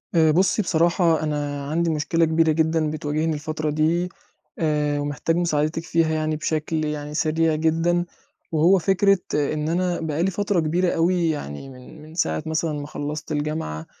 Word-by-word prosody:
آآ، 160 -1 +5
بُصِّي، 190 +6 +2
بصراحة، 170 -2 +2
أنا 145 -2 -2
عندي 165 +2 +1
مشكلة 165 +2 +1
كبيرة 160 0 +3
جدًا 160 0 +1
بتواجهني 155 +1 -1
الفترة 155 +1 -3
دي، 160 +4 +1 0.5
آآ، 150 -2 +1
ومحتاج 145 +3 -1
مساعدتِك 160 -2 0
فيها 165 -2 +1
يعني 155 0 0
بشكل 155 0 -1
يعني 150 0 -4
سريع 160 +1 +1
جدًا. 165 +2 +1 0.5
وهو 165 +4 +4
فكرة 195 +3 +3 0.2
إن 150 +1 0
أنا 175 +1 0
بقى 160 0 -1
لي 190 - +1
فترة 200 0 0
كبيرة 170 +3 +1
أوي، 170 0 +2
يعني 135 - -5
من 130 +4 -13
من 155 +1 -13
ساعة 170 - 0
مثلًا 160 0 -1
ما 145 - -6
خلَّصت 150 +1 -5
الجامعة، 145 - -3
160 Hz, 160 wpm, -23 LUFS, 150-165 Hz, 0.5 s, آآ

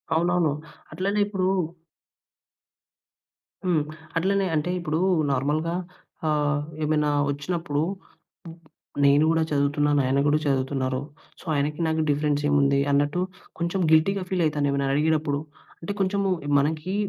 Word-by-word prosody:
అవునవును. 175 -1 +2 0.4
అట్లనే 195 +6 0
ఇప్పుడూ 190 -3 -1 2.2
హ్మ్. 165 -5 +2 0.3
అట్లనే 195 +3 +1
అంటే, 155 +4 0
ఇప్పుడూ 160 -2 -1 0.3
నార్మల్‍గా 150 +5 0 0.5
ఆహ్, 150 -1 +1 0.2
ఏమైనా 150 -1 +1 0.2
ఒచ్చినప్పుడు, 150 +1 -2 0.6
హ్మ్, 165 - -9 0.5
నేను 140 +2 +5
గూడా 165 0 +2
చదువుతున్నాను, 145 0 +2
ఆయన 135 +2 +1
కూడా 150 +1 +4
చదువుతున్నారు. 130 -1 0 0.4
సో, - - -15
ఆయనకి 150 +2 -1
నాకు 160 0 +1
డిఫరెన్సేముంది 145 -1 +2
అన్నట్టు, 145 +5 +1 0.4
కొంచెం 170 +3 -1
గిల్టీగా 185 +5 +3
ఫీలయితానెవరినన్న 145 -6 +1
అడిగేటప్పుడు. 150 -1 +1 0.4
అంటే, 170 - -5
కొంచము 195 0 +1 0.2
ఎ - - -2
మనకీ 160 +6 -1
150 Hz, 110 wpm, -25 LUFS, 145-170 Hz, 2.2 s, నేను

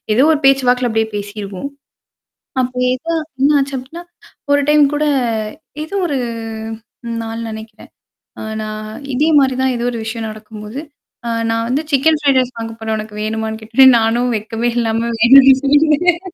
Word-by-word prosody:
ஏதோ 245 - +4
ஒரு 300 - +1
பேச்சு 270 -1 +4
வாக்குல 250 0 +2
அப்படியே 220 0 0
பேசிருவோம். 205 +2 -5 0.9
அப்ப 255 0 -2 0.2
ஏதோ 325 +6 -4 0.3
என்ன 290 +2 +4
ஆச்சு 275 0 -1
அப்படின்னா, 275 +7 -8 0.5
ஒரு 285 - +4
டைம் 300 0 +5
கூட, 300 +1 0 0.8
ஏதோ 335 +6 -7
ஒரு 285 -4 -1 1.1
நாள் 225 +1 -5
நெனைக்கிறேன். 220 0 -10 0.5
அ - - -7 0.2
நான் 215 0 -6 0.3
இதே 300 +5 +2
மாரி 265 -2 +2
தான் 260 -1 +1
ஏதோ 240 0 -3
ஒரு 235 - -5
விஷயம் 225 0 -4
நடக்கும்போது, 215 +2 -9 0.5
அ - - -1 0.2
நான் 230 0 -1
வந்து 275 +5 +1
சிக்கன் 300 +3 +3
ஃப்ரைட் 275 -3 +3
ரைஸ் 255 0 -2
வாங்க 225 0 -5
போறேன் 220 0 -2
உனக்கு 215 0 -7
வேணுமான்னு 220 0 -3
கேட்டார். 230 +5 +4
நானும் 240 +2 +1
வெக்கமே 225 +3 -2
இல்லாம, 230 0 0
வேணும்ன்னே 265 +3 +8
சொல்லிட்டேன். 310 +4 +3
245 Hz, 160 wpm, -17 LUFS, 220-275 Hz, 1.1 s, வேணும்ன்னே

